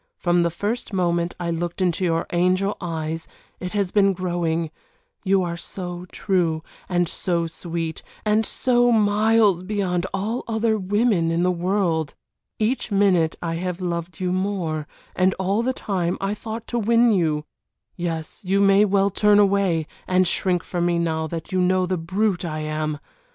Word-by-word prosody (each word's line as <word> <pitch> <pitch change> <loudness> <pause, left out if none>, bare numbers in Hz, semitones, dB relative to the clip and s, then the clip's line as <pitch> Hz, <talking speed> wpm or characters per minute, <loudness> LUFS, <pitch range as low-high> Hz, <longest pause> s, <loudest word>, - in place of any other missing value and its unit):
From 175 0 +2
the 170 - +2
first 210 +6 -3
moment 175 -2 0
I 170 -1 -2
looked 170 +2 -3
into 185 0 +1
your 165 -2 +1
angel 185 +3 +2
eyes 165 -2 -3 0.3
it 180 +1 -5
has 200 -3 0
been 195 -2 +4
growing, 170 -3 -1 0.5
you 195 -1 +3
are 170 -1 -3
so 180 0 -7
true 170 -5 0 0.3
and 175 -1 +2
so 170 0 -1
sweet, 165 -1 -4 0.2
and 215 +1 +3
so 245 +1 +2
miles 215 -3 +3
beyond 185 -2 -1
all 210 +5 -2
other 220 -1 +1
women 200 -3 +2
in 165 +1 +1
the 180 - +3
world. 175 -3 0 0.4
Each 235 +3 0
minute 190 -5 +3
I 165 -1 -2
have 180 0 -3
loved 170 -1 -4
you 180 -1 0
more 180 -6 -2 0.3
and 185 0 +2
all 195 +4 0
the 255 +2 +1
time 185 -8 -2
I 195 +1 -1
thought 220 +2 -6
to 240 - 0
win 235 +2 +4
you. 155 -6 +1 0.5
Yes, 165 -1 -4
you 195 +1 +1
may 200 +1 +5
well 200 0 +2
turn 210 +1 +4
away, 195 -5 +3 0.2
and 185 0 +3
shrink 180 0 +1
from 175 -1 -1
me 175 -1 +1
now 160 -1 0
that 165 +3 -6
you 185 -1 +1
know 185 0 +2
the 185 0 -1
brute 190 +3 0
I 155 -2 -3
am. 155 0 -2
180 Hz, 165 wpm, -23 LUFS, 170-200 Hz, 0.5 s, may